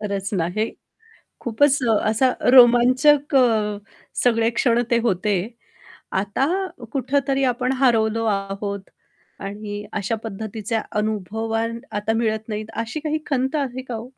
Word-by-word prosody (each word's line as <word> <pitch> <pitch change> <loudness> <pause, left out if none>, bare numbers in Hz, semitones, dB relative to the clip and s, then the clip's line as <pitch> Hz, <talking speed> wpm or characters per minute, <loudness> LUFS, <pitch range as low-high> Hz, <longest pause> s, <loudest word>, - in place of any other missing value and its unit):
खरंच 200 -2 -3
आहे. 185 +7 -1 0.7
खूपच 280 +4 +3 0.2
असा 225 +4 +2 0.2
रोमांचक 255 +4 +6
अ, 220 -5 +3 0.5
सगळे 230 -2 +3
क्षण 240 -2 +3
ते 235 - +5
होते. 205 -1 +1 0.8
आता 200 +8 0 0.4
कुठेतरी 275 0 0
आपण 250 0 +1
हरवलो 225 -3 +2
आहोत 200 -1 -3 0.5
आणि 205 +1 -6
अशा 210 +2 -1
पद्धतीचे 220 +1 -4 0.2
अनुभवान 220 +2 -2
आता 210 +2 -1
मिळत 220 -1 -1
नाहीत 215 0 -3 0.2
अशी 230 +7 -5
काही 310 0 -2
खंत 265 +1 0
आहे 260 -3 -2
का 245 - -5
हो? 220 - -5
225 Hz, 120 wpm, -22 LUFS, 210-255 Hz, 0.8 s, रोमांचक